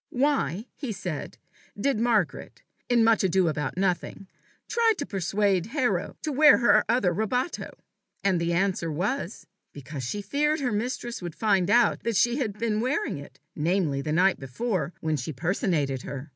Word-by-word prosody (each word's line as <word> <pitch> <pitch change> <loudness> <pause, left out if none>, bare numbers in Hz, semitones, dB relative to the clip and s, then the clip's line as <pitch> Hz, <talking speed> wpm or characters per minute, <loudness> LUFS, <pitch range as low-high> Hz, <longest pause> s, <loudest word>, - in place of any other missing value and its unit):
"Why," 245 - 0
he 270 -5 -5
said, 180 -7 -5 0.4
"did 270 +1 +1
Margaret, 225 -6 0 0.3
in 240 -2 +4
Much 225 -2 +4
ado 185 -1 +3
about 150 0 -2
Nothing, 190 +1 -1 0.4
try 460 -1 +3
to 285 - -3
persuade 195 -2 0
Hero 205 -10 0
to 310 - -1
wear 295 +1 +7
her 240 - +4
other 225 -7 +2
rabato?" 250 - -2 0.5
And 190 -4 +2
the 170 0 0
answer 170 -2 0
was, 195 - -3 0.3
"Because 140 0 -7
she 205 +12 -3
feared 300 +8 +1
her 255 -5 -1
mistress 240 +2 -3
would 175 -2 -6
find 200 -5 +2
out 240 -2 +4
that 230 -2 -2
she 240 +5 +3
had 215 -8 -2
been 220 -1 0
wearing 260 - -1
it 140 - -13 0.2
namely, 160 -3 0
the 150 - -3
night 180 +4 +3
before, 175 - -2
when 155 -1 0
she 135 +4 -4
personated 155 - -1
her." 135 +4 -7
195 Hz, 165 wpm, -26 LUFS, 170-240 Hz, 0.5 s, wear